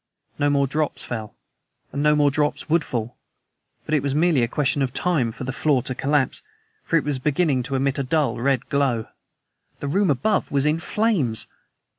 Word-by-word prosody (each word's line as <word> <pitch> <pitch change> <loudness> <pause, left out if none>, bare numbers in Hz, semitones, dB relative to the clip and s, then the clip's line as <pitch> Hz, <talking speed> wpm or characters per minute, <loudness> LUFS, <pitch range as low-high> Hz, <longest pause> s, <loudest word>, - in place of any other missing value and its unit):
No 145 - +3
more 140 -1 +3
drops 150 +2 -2
fell, 110 - -6 0.6
and 140 - -3
no 150 0 +4
more 145 -1 +3
drops 150 +1 -1
would 165 +1 +2
fall; 120 -1 -4 0.7
but 155 - -3
it 150 - +3
was 140 0 -1
merely 160 -3 +3
a 115 - +2
question 140 +2 0
of 130 -2 -1
time 155 -11 +1
for 120 - -8
the 130 +1 -3
floor 140 -4 +1
to 130 - -3
collapse. 140 +1 0 0.4
For 165 - +2
it 150 - +1
was 145 -2 -2
beginning 145 -1 +1
to 135 +2 -4
emit 135 +1 0
a - - 0
dull, 150 0 0
red 135 0 +1
glow. 135 -6 0 0.7
The 145 - -4
room 195 +6 +2
above 145 - +1
me - - -5
was 140 0 +3
in 150 +2 +2
flames! 165 - 0
140 Hz, 200 wpm, -23 LUFS, 130-150 Hz, 0.7 s, no